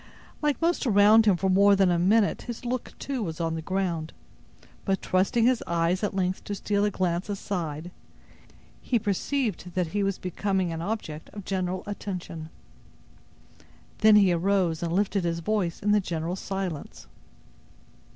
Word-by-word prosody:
Like 295 -2 +1
most 335 -4 +1
around 215 +1 +6
him 195 -4 +5
for 190 - 0
more 200 +2 +5
than 190 -2 +3
a 170 - +2
minute 200 +4 +3
his 240 +1 -7
look, 250 0 -3
too, 270 -3 -3
was 165 -5 -4
on 165 -1 -1
the 165 - -3
ground; 170 -3 -2 0.7
but, 195 -1 0
trusting 195 +5 +1
his 250 -1 +2
eyes 170 +2 +1
at 205 - -1
length 185 -1 -1
to 205 - -3
steal 205 +1 0
a - - +2
glance 185 -1 -1
aside, 175 -5 -4 0.9
he 245 - +1
perceived 210 -2 -2
that 180 -3 0
he 205 +4 -1
was 195 -1 0
becoming 185 -1 -1
an 165 - -4
object 170 -6 -4
of 205 -3 -8
general 185 -1 -2
attention. 180 -5 -6 1.5
Then 215 -1 +7
he 195 -4 +5
arose 175 -2 +1
and 170 -1 -2
lifted 195 +1 +1
his 170 -1 -1
voice 180 -1 -1
in 210 - +1
the 210 0 +4
general 170 -1 -3
silence. 190 - -5
190 Hz, 160 wpm, -26 LUFS, 170-205 Hz, 1.5 s, Then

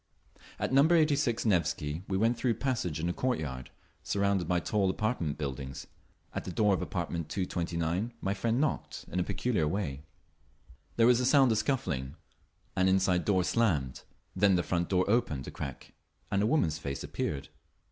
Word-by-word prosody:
At - - -2
Number 150 +6 +6
86 145 -7 +2
Nevsky 80 -5 0
we 95 - 0
went 115 +4 +2
through 125 - -1
a - - -9
passage 110 - -2
into 85 +2 0
a - - -4
courtyard, 75 - -2 0.3
surrounded 100 -3 0
by 90 0 +2
tall 100 +2 +1
apartment 95 - -1
buildings. 70 -2 -5 0.5
At - - -3
the - - -5
door 105 +2 +3
of 95 - 0
apartment 85 -3 -3
229 85 +2 -2
my 95 - -1
friend 115 +4 0
knocked 155 0 -2
in 90 - -1
a - - +2
peculiar 105 -6 0
way. 75 -6 -2 0.9
There 115 - +4
was 125 0 +5
a 125 - +1
sound 135 -3 +5
of 110 - +2
scuffling; 70 - -2 0.6
an 95 -1 +3
inside 95 -1 +2
door 95 -3 +3
slammed; 85 - 0 0.3
then 95 0 +4
the 85 - +1
front 85 -1 -1
door 90 -1 +2
opened 100 - +1
a - - -5
crack 70 -3 -7 0.4
and 100 - +2
a 105 - +2
woman's 85 - +1
face 70 -2 -4
appeared. 70 -2 -3
95 Hz, 175 wpm, -30 LUFS, 80-115 Hz, 0.9 s, Number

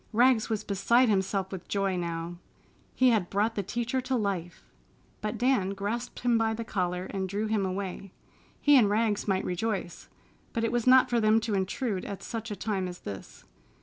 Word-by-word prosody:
Rags 240 -1 +4
was 220 -1 -1
beside 235 +5 +3
himself 195 -1 0
with 185 -2 -7
joy 195 -2 0
now. 170 0 -4 0.6
He 255 0 +5
had 205 -6 +1
brought 210 +3 +1
the 205 - -1
teacher 240 +6 -2
to 260 +1 -1
life. 195 -6 -2 0.6
But 215 +2 -3
Dan 225 -5 +1
grasped 210 +5 -4
him 240 -2 +3
by 220 0 +1
the 230 - -4
collar 180 -4 -2
and 190 -1 -3
drew 205 +3 -1
him 215 -3 0
away. 190 0 -5 0.5
He 290 0 +5
and 210 -4 +4
Rags 210 0 +1
might 190 -1 +1
rejoice, 185 -1 -3 0.4
but 230 - -1
it 230 - +1
was 240 0 -1
not 255 0 +6
for 240 - +3
them 215 0 +4
to 220 -1 -2
intrude 195 +2 -1
at 200 - -6
such 230 0 -5
a 210 - -3
time 195 -3 -2
as 180 0 -8
this. 100 -1 -8
210 Hz, 190 wpm, -28 LUFS, 190-230 Hz, 0.6 s, not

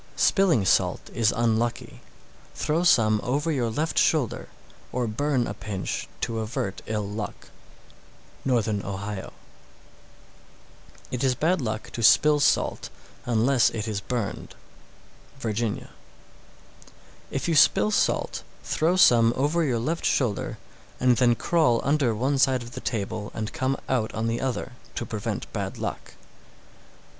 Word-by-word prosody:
645. - - 0
Spilling 175 - +3
salt - - +1
is 115 -1 +2
unlucky; 115 0 -1 0.5
throw 160 +3 0
some 110 -10 +4
over 145 +6 0
your 125 -6 0
left 150 +8 0
shoulder, 145 -8 +1 0.4
or 125 -1 -1
burn 125 +3 0
a - - -4
pinch 95 -4 -4
to 115 -1 -2
avert 110 -3 -3
ill 105 -2 -2
luck. 105 0 -6 0.9
Northern 110 -6 +1
Ohio. 100 0 -5 1.8
646. - - -11
It 125 - -2
is 130 -2 +2
bad 165 +5 +1
luck 110 -2 -4
to 115 - -5
spill 150 +6 +5
salt 140 - +1 0.4
unless 120 +2 +3
it 110 -1 -4
is 105 -2 -2
burned. 115 -1 -4 0.8
Virginia. 115 -2 -3 1.4
647. - - -10
If 135 - -1
you 170 - +1
spill 105 -6 +5
salt, - - 0 0.2
throw 165 +3 +1
some 115 -10 +6
over 150 +6 +1
your 130 -6 +1
left 155 +9 -2
shoulder, 120 -7 0 0.4
and 125 -1 +3
then 120 -2 +4
crawl 150 -5 +2
under 140 -5 +2
one 135 +5 0
side 130 -2 +3
of 120 - -10
the - - -7
table 105 -2 -3
and 110 0 -4
come 130 +1 -1
out 120 -4 0
on 110 - -1
the 115 +1 -1
other, 130 -1 -2 0.2
to 120 - -3
prevent 105 -2 -4
bad - - -4
luck. - - -5
120 Hz, 140 wpm, -25 LUFS, 110-135 Hz, 1.8 s, some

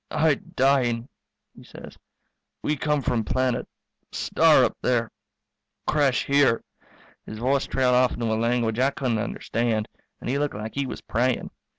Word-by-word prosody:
"I 160 -1 +3
dying," 130 -3 0 0.5
he - - -14
says. - - -12 0.7
"We 150 - 0
come 150 -1 0
from 120 -2 0
planet 130 +2 -1 0.4
star - - +4
up - - -2
there 120 -2 0 0.7
crash 140 -4 +2
here 140 -4 +3 0.3
" - - -28
His 110 - -7
voice 130 +4 0
trailed 130 -1 +2
off 125 0 +3
into 120 - -3
a 110 - 0
language 115 0 0
I 130 +2 +4
couldn't 125 -5 -1
understand, 115 -1 -1 0.3
and - - -8
he 135 +3 0
looked 145 0 -1
like 110 +1 -6
he 140 -1 -2
was - - -6
praying. 125 +2 -1
125 Hz, 160 wpm, -25 LUFS, 115-135 Hz, 0.7 s, star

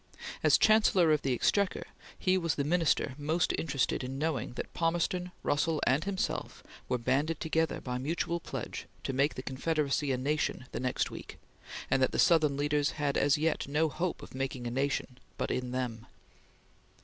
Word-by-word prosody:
As - - +5
Chancellor 210 -6 +5
of 150 - +3
the 135 - 0
Exchequer 200 - +1 0.3
he 185 0 +2
was 165 -4 0
the 140 - 0
Minister 160 -3 +1
most 155 +4 +1
interested 140 -4 0
in 130 +1 -4
knowing 150 -6 -2
that - - -6
Palmerston, 175 +2 0
Russell, 150 +2 +1
and 140 +6 +2
himself 200 -1 -3 0.3
were 125 - +2
banded 140 +7 0
together 160 0 0
by 125 -1 -4
mutual 170 +4 -1
pledge - - -6 0.2
to 135 - -2
make 140 +3 +2
the 130 - -6
Confederacy 145 +1 0
a 130 - +1
nation 145 0 -1
the - - -4
next 125 0 -1
week, - - -9 0.5
and 135 - +3
that 130 - +2
the - - -1
Southern 155 -5 +4
leaders 145 0 +1
had 145 -2 -1
as 140 0 +3
yet 155 -1 0
no 155 +3 +1
hope 170 +4 -3
of - - -11
"making 130 -1 -3
a 120 - -2
nation" 135 -1 -2 0.2
but - - -2
in 125 -1 -2
them. 125 -3 -3
145 Hz, 175 wpm, -31 LUFS, 130-165 Hz, 0.5 s, As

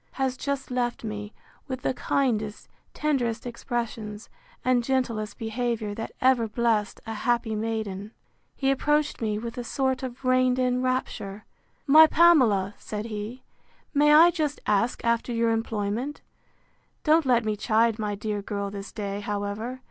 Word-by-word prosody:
—has 265 -1 -1
just 280 -1 -3
left 245 -1 -1
me, 210 -1 -5 0.4
with 260 -2 -5
the - - +1
kindest, 220 -6 -1 0.2
tenderest 250 -7 -1
expressions, 230 -3 -4 0.4
and 250 -1 +3
gentlest 230 -5 -1
behaviour, 225 -1 -2
that 225 +2 -5
ever 255 -3 +3
blest 220 -2 0
a 225 - -4
happy 235 0 0
maiden. 215 -2 -3 0.5
He 270 -1 +1
approached 295 +1 +1
me 215 -2 0
with 230 +3 -5
a - - -3
sort 260 +2 -1
of 255 0 -7
reined 255 0 +3
in 250 -1 +1
rapture. 215 -5 -2 0.4
My 310 +3 +8
Pamela! 255 - +4
said 210 0 -5
he, 220 +3 -6 0.5
May 295 +1 +5
I 325 +3 +8
just 305 -4 -2
ask 210 +4 +1
after 235 +1 +1
your 230 -1 +2
employment? 225 +4 -2 0.8
Don't 315 -1 +4
let 240 -3 +3
me 215 -1 0
chide 225 +2 +2
my 210 -1 -2
dear 210 0 -3
girl 200 -1 -4
this 200 0 -7
day, 200 -2 -4
however. 205 +4 -4
235 Hz, 150 wpm, -26 LUFS, 210-255 Hz, 0.8 s, My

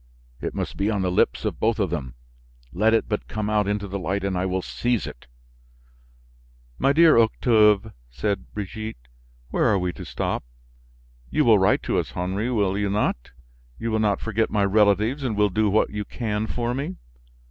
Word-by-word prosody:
It - - -4
must - - -4
be 100 +2 +1
on 100 -3 0
the 90 - 0
lips 90 - +1
of - - -2
both 115 0 +1
of 100 -6 0
them. 65 -8 -4 0.6
Let 110 +5 +3
it - - 0
but 105 -1 -3
come 105 -1 -3
out 105 -2 +2
into 105 0 -1
the 100 +1 -4
light 95 +2 -2
and 100 -1 -1
I 90 +1 0
will 95 0 -2
seize 120 -3 -1
it." - - -10 1.5
"My 135 - +3
dear 160 -3 +6
Octave," 110 -2 +3 0.2
said 100 - -3
Brigitte, 105 - -6 0.4
"where - - +1
are 105 - +4
we 90 -1 -2
to - - -9
stop? - - -3 0.9
You - - +2
will - - +6
write - - +3
to - - 0
us, - - -3
Henry, 95 +6 -2
will 100 -5 +1
you 100 -1 0
not? 100 - -1 0.5
You 115 - -3
will 110 - +1
not 105 -2 +1
forget 110 0 -1
my 105 -2 +1
relatives 105 +6 +3
and 120 -5 -1
will 105 0 +3
do 105 +2 +1
what 105 +2 +2
you 105 0 -3
can 110 -1 -3
for 120 +1 -2
me?" 145 +8 -3
105 Hz, 190 wpm, -24 LUFS, 95-110 Hz, 1.5 s, dear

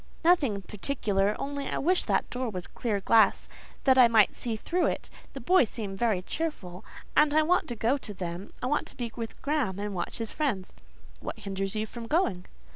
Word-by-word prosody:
"Nothing 280 - +3
particular; 210 -2 0
only 280 0 -4
I - - -2
wish 360 +5 +2
that - - +1
door 250 -1 -2
was 180 -4 -5
clear 205 +2 -2
glass—that 230 +5 +2
I 245 - +9
might 225 -3 +4
see 235 -2 -3
through 345 +11 0
it. - - -3 0.2
The 275 - -6
boys 270 - +4
seem 205 -5 -5
very 205 -3 +1
cheerful, 205 - -4 0.3
and 300 0 +4
I 310 - +5
want 355 +4 +2
to 240 - -4
go 230 +5 +1
to 210 - -6
them: 175 +1 -5
I - - +1
want 295 +4 0
to - - -10
be 235 -2 -3
with 230 -2 -6
Graham, 280 -10 0
and 205 0 -3
watch 175 -2 -3
his 225 -2 -3
friends." 235 -12 -2 0.5
"What - - -6
hinders 195 0 -3
you 215 0 0
from 230 +1 -8
going?" 235 - 0
230 Hz, 200 wpm, -28 LUFS, 200-280 Hz, 0.5 s, I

